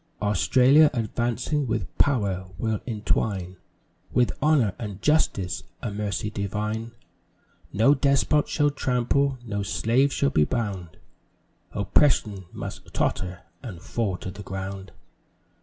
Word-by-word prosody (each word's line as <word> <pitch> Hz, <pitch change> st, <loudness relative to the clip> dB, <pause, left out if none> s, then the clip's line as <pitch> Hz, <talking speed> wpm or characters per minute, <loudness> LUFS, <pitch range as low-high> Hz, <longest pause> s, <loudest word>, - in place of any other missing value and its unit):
Australia, 130 Hz, -, +5 dB
advancing 120 Hz, +5 st, -1 dB
with 115 Hz, -1 st, -3 dB
Power, 100 Hz, -9 st, +1 dB
will 110 Hz, +2 st, -1 dB
entwine 100 Hz, -4 st, -1 dB, 0.5 s
With 125 Hz, -1 st, +3 dB
Honour 135 Hz, -9 st, +3 dB
and 105 Hz, -4 st, -6 dB
Justice 95 Hz, -, +1 dB, 0.2 s
a 115 Hz, -, -2 dB
Mercy 105 Hz, 0 st, -3 dB
divine; 105 Hz, +3 st, -3 dB, 0.8 s
No 115 Hz, +8 st, +5 dB
Despot 140 Hz, +1 st, +2 dB
shall 145 Hz, -1 st, +2 dB
trample 135 Hz, +1 st, +1 dB
no 100 Hz, -2 st, -2 dB
slave 115 Hz, +7 st, +2 dB
shall 140 Hz, 0 st, +1 dB
be 75 Hz, -, +4 dB
bound 100 Hz, -5 st, -3 dB, 0.7 s
Oppression 105 Hz, -, +2 dB
must -, -, -8 dB
totter 90 Hz, -1 st, -1 dB, 0.2 s
and 100 Hz, -9 st, -8 dB
fall 100 Hz, 0 st, -2 dB
to 95 Hz, -, -6 dB
the 100 Hz, +3 st, -9 dB
ground. 95 Hz, 0 st, -6 dB
110 Hz, 115 wpm, -25 LUFS, 95-130 Hz, 0.8 s, Australia